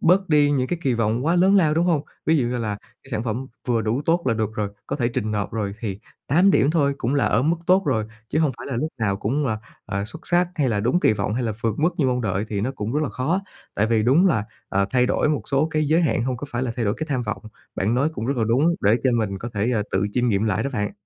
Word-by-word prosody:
bớt 185 +3 +3
đi 150 -2 +4
những 130 -3 +1
cái 175 - -2
kỳ 130 -3 +1
vọng 115 +3 0
quá 170 +2 +3
lớn 190 +3 +5
lao, 155 -5 +4
đúng 170 +2 +2
hông? 160 -5 +2 0.2
Ví 160 0 +4
dụ 130 - +1
như 125 +1 -2
là 110 -3 -2 0.3
cái 135 - -15
sản 110 -3 -2
phẩm 120 +4 -3 0.2
vừa 120 -2 +2
đủ 115 +6 -1
tốt 170 +1 +2
là 120 - +2
được 110 -1 -2
rồi, 105 -2 -1 0.2
có - - -2
thể 120 -4 +1
trình 110 -2 -2
nộp 105 -1 -2
rồi 100 -3 -2
thì 100 -4 -4 0.3
8 175 +8 +4
điểm 145 - +3
thôi 145 -4 +2
cũng 125 +5 -1
là 140 - +2
ở 115 - +2
mức 160 +5 +2
tốt 185 +2 +5
rồi, 110 -6 +1 0.2
chứ - - 0
hông 155 -3 +3
phải - - -8
là 135 - -3
lúc 155 +7 -1
nào 100 -3 0
cũng 135 +9 -1
là, 110 -3 -1 0.3
ờ, 100 +1 -2
xuất 155 +10 -9
sắc, 175 0 +3
hay 145 -6 +1
là 105 -3 0
đúng 125 - +1
kỳ 110 - +4
vọng, 105 0 -2
hay 125 - -1
là 115 -2 -1
vượt 115 -3 +1
mức 160 +4 +3
như 140 - +3
mong 125 -1 +1
đợi 100 -3 -1
thì 100 -2 -2
nó 120 +6 -1
cũng 105 0 -4
rất 150 - +1
là 150 - -1
khó. 155 +11 -1 0.3
Tại 110 - +2
vì 115 -1 +2
đúng 140 - +4
là, 110 - +2 0.2
ờ, 100 0 +1
thay 125 -1 +3
đổi - - +1
một 150 -1 0
số 140 +2 +2
cái 155 -1 +1
giới 155 +3 +3
hạn 145 -7 +1
hông 130 -1 -1
có 145 - -6
phải 120 +2 -2
là 125 - -1
thay 120 - -1
đổi 100 0 +1
cái 155 - -4
tham 130 -4 0
vọng. 105 -4 -4 0.3
Bạn 105 +5 0
nói 135 +5 +2
cũng 115 - -4
rất 140 0 -1
là 115 - +1
đúng 150 +9 +3
để 105 +3 +4
cho 130 - +3
mình 105 -4 -1
có 120 - -5
thể, 105 +4 0
ờ, 110 -4 +1
tự 95 +2 +1
chiêm 125 -1 +1
nghiệm 105 -1 +1
lại 105 0 0
đó 140 - -2
bạn. 105 -4 -2
125 Hz, 305 wpm, -23 LUFS, 110-150 Hz, 0.3 s, lớn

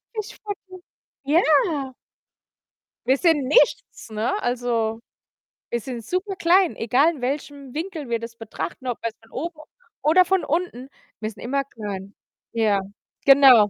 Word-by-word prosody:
Fischfutter. 420 -1 -5 0.6
Ja. 290 -2 +3 1.1
Wir 265 +2 +5
sind 300 -4 +3
nichts, 295 - +2
ne? 220 - -1
Also, 235 -2 0 0.7
wir 235 - 0
sind 235 -1 -6
super 370 - -2
klein, 360 0 +4
egal 260 +8 +3
in 265 - -11
welchem 280 +1 -3
Winkel 315 -5 -4
wir 230 - +1
das 230 0 -8
betrachten, 225 +1 -6
ob 245 - -1
jetzt 225 -1 -3
von 225 - -22
oben 320 +3 -5 0.4
oder 345 +5 +5
von 380 +1 +2
unten, 295 -5 -2 0.3
wir 215 - -2
sind 220 - -12
immer 275 +3 0
klein. 205 -6 -7 0.4
Ja, 215 -3 +3 0.5
genau. 265 -6 +8
265 Hz, 135 wpm, -24 LUFS, 230-325 Hz, 1.1 s, genau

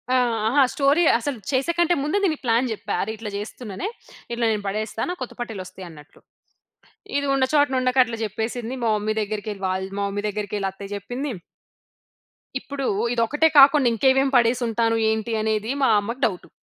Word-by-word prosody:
ఆ! - - +5 0.3
అహ! 265 +6 +2
స్టోరీ 285 +4 +3 0.2
అసలు, 265 0 -3
చేసేకంటే 340 +6 +2
ముందు 300 +7 0
దీనికి 315 -6 0
ప్లాన్ 235 +2 +2
జెప్పా. 220 - -4
"అరె! - - -2
ఇట్లా 215 -1 -6
చేస్తున్ననే, 215 - -6 0.5
ఇట్లా 235 0 0
నేను 210 -2 -2
పడేస్తా. 215 +2 -3
నాకు 360 -4 -5
కొత్త 250 - -8
పట్టీలు 225 -5 -5
వస్తాయన్నట్లు" 165 -6 -12 1.0
ఇది 285 - -1
ఉన్న 270 -1 +3
చోటన 285 -3 +3
ఉండక 255 +1 0
అట్లా 230 -1 -5
చెప్పేసింది. 225 +3 -4
మా 230 - +1
మమ్మీ 215 +1 -1
దగ్గరికి 215 0 -3
ఎళ్లి, 195 -1 -11
వాళ్ళ్ 190 +1 -2
మా - - 0
మమ్మీ 205 +1 -3
దగ్గరికి 210 0 -3
ఎళ్లి 195 -1 -1
అత్తయ్య 200 +1 -8
చెప్పింది. 245 +8 -4 1.3
ఇప్పుడూ, 275 +1 -5 0.3
ఇది 235 - +1
ఒక్కటే 295 +7 +3
కాకుండా 275 -1 +7
ఇంకేమేం 265 +4 +3
పడేసుంటాను, 230 -1 +2
ఏంటి? 220 +1 -1
అనేది 220 +1 -1
మా 265 - +4
అమ్మకు 230 +6 -5
డౌటు. 185 -5 -3
230 Hz, 170 wpm, -23 LUFS, 210-270 Hz, 1.3 s, కాకుండా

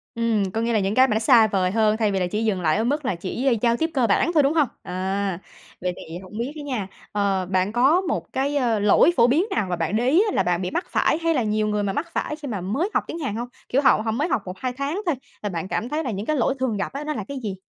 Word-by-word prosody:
Ừm, 225 -4 0
có 225 - -2
nghĩa 230 +1 0
là 220 - +3
những 195 +1 -1
cái 260 +1 +6
mà 225 - 0
nó - - +2
xa 225 -1 +6
vời 190 -3 0
hơn 215 0 +2
thay 215 -2 +1
vì 195 - 0
là 180 - 0
chỉ 210 +5 -2
dừng 195 -4 0
lại 160 +1 +2
ở 220 - +1
mức 285 +4 -1
là 195 - 0
chỉ 235 +8 -1
giao 235 -1 +2
tiếp 320 +4 0
cơ 255 -5 +2
bản 225 +11 +2
thôi, 305 -3 +5
đúng 275 +2 +2
hông? 310 -4 +3 0.2
À, 190 0 -2 0.4
vậy 180 0 -1
thì 165 +2 -8
hổng 190 +3 -10
biết 240 +4 -2
ấy 300 - -7
nha, 250 -9 -3 0.2
ờ, 200 -2 0
bạn 185 +2 0
có 270 +10 +4
một 365 - -3
cái, 275 +2 0
ơ, 235 -5 +1
lỗi 205 - +5
phổ 235 - +6
biến 300 +10 +3
nào 205 - 0
mà 180 - 0
bạn 165 +4 -2
để 240 +3 +2
ý 335 +9 +5
là - - +2
bạn 175 0 0
bị 180 0 -3
mắc 355 - -2
phải - - +2
hay 330 0 +2
là 260 -6 +1
nhiều 215 0 0
người 210 -1 0
mà 195 -1 -1
mắc 315 - -2
phải 300 - -2
khi 300 -2 -8
mà 210 -7 -3
mới 260 - -1
học - - +1
tiếng 335 - -5
Hàn 265 -9 -3
hông? 240 +1 -4 0.2
Kiểu 270 - +2
họ 265 -5 +4
họ 220 - 0
mới 280 +9 0
học 265 - 0
1-2 195 +8 -4
tháng 280 +9 -3
thôi 335 -5 +1 0.3
là 205 - -1
bạn 175 -1 -4
cảm 230 +5 -2
thấy 310 +3 -1
là 255 - -2
những 200 +1 -4
cái 310 - 0
lỗi 270 0 +1
thường 250 -5 0
gặp 200 - -3
á, 280 +2 -4
nó 305 0 -2
là 220 - -4
cái 280 -1 -5
gì? 200 -3 -4
225 Hz, 310 wpm, -23 LUFS, 195-275 Hz, 0.4 s, cái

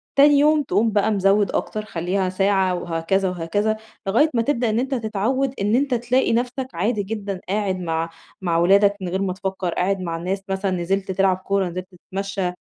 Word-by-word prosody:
تاني 285 0 +6
يوم 300 +1 +4
تقوم 220 -1 +1
بقى 210 +1 +2
مزوِّد 200 0 +3
أكتر، 215 0 -3
خلِّيها 185 +1 -1
ساعة 190 -1 +2
وهكذا 175 +3 0
وهكذا، 205 +5 -1 0.3
لغاية 240 +11 +4
ما 230 - +2
تبدأ 240 -1 0
إن 215 +1 +1
أنتَ 265 +2 -1
تتعوَّد، 235 +4 -1
إن 205 +3 +2
أنتَ 275 +1 +1
تلاقي 245 +1 +1
نفسَك 250 +2 -1
عادي 205 +5 0
جدًا 200 -2 -4
قاعد 195 -2 0
مع 165 -1 -2 0.3
مع 170 -3 0
ولادك 200 +4 +4
من 185 - -3
غير 190 +2 -1
ما 190 -2 -1
تفكر، 190 -1 -3
قاعد 195 +2 0
مع 170 -2 -3
الناس 185 +3 -3
مثلًا، 190 0 -1
نزلت 190 +2 -1
تلعب 190 0 +2
كورة، 190 0 -1
نزلت 180 +1 -5 0.3
تتمشَّى، 195 -1 -2
195 Hz, 185 wpm, -22 LUFS, 185-225 Hz, 0.3 s, تاني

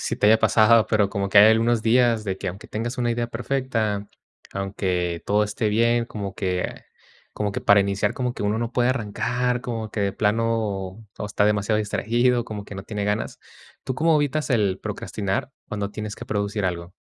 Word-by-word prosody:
si - - -2
te - - +2
haya 110 +1 +6
pasado, 110 0 +5
pero 105 -3 +2
como 100 -1 -2
que 100 - -1
hay 105 +2 +9
algunos 115 0 +2
días, 115 -1 +3
de 95 -2 -3
que, 95 - -3
aunque 95 +4 -8
tengas 115 +3 -4
una 120 -1 0
idea 120 0 -1
perfecta, 115 -4 -2 0.4
aunque 90 -3 -2
todo 105 +1 +3
esté 105 +1 -1
bien, 115 +2 +2
como 100 -3 -6
que 90 -3 -3 0.5
como 105 -1 -2
que, - - -3
para 100 0 +5
iniciar, 100 +1 0
como 125 -1 -2
que 105 - -6
uno 105 +1 0
no 115 +1 -3
puede 125 0 +2
arrancar, 125 +1 -1
como 115 -4 -4
que 105 - -3
de 100 -1 0
plano 105 -2 -1
todo 105 - -6
está 105 0 +1
demasiado 105 +1 +2
distraído, 120 +3 +1
como 105 -2 -6
que 100 - -10
no 95 - -6
tiene 105 0 -4
ganas. 105 +1 -2 0.4
¿Tú 130 - -2
cómo 160 +2 +3
evitas 150 +1 0
el 105 -7 +1
procrastinar 100 +5 -3 0.2
cuando 105 -1 -3
tienes 105 0 -5
que - - -9
producir 100 0 -2
algo? 90 -1 -3
105 Hz, 195 wpm, -23 LUFS, 100-115 Hz, 0.5 s, hay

